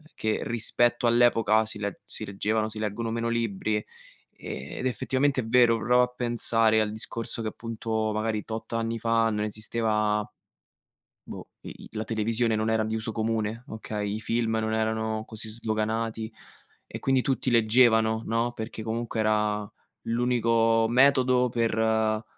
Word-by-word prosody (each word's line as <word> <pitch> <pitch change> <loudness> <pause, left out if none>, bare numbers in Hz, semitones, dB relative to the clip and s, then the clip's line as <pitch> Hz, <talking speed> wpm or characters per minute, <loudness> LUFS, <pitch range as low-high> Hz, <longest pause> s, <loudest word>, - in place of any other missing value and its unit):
che 110 0 -1
rispetto 120 +1 +2
all'epoca 115 -2 +4
si 110 -1 -6
le 100 -2 -4
si - - -4
leggevano 110 +2 -1
si 110 0 -9
leggono 110 +2 -3
meno 115 0 -1
libri, 110 -2 -1
ehm, 105 - -5 0.9
ed 130 - 0
effettivamente, 130 +3 0
è - - -7
vero. 120 0 +4
Prova 125 +2 +3
a - - +1
pensare 115 -2 +2
al 105 - 0
discorso 115 +1 -3
che 110 - -1
appunto 110 -1 -3
magari 110 0 -1
tot 110 +1 -6
anni 115 0 -1
fa 115 0 +2
non 105 -1 -1
esisteva 105 -1 0 1.0
boh, - - -9
i - - -8
i - - -10
la 110 - -2
televisione 115 +1 0
non 110 +1 0
era 110 0 +2
di 110 +1 -2
uso 110 +1 -3
comune, 110 +1 -2
okay, 105 -2 -4
i - - -4
film 115 +1 0
non 110 0 -1
erano 110 0 -1
così 110 0 -5
sdoganati 110 0 -2 0.6
e - - -7
quindi 135 -1 +2
tutti 135 -1 -1
leggevano, 110 -1 +4
no, 115 +2 0
perché 110 -1 -6
comunque 115 +1 -3
era 105 -1 +1 0.3
l'unico 115 -1 +2
metodo 125 0 +4
per, 115 -1 0
uhm, 110 -1 +1
110 Hz, 155 wpm, -27 LUFS, 110-115 Hz, 1.0 s, all'epoca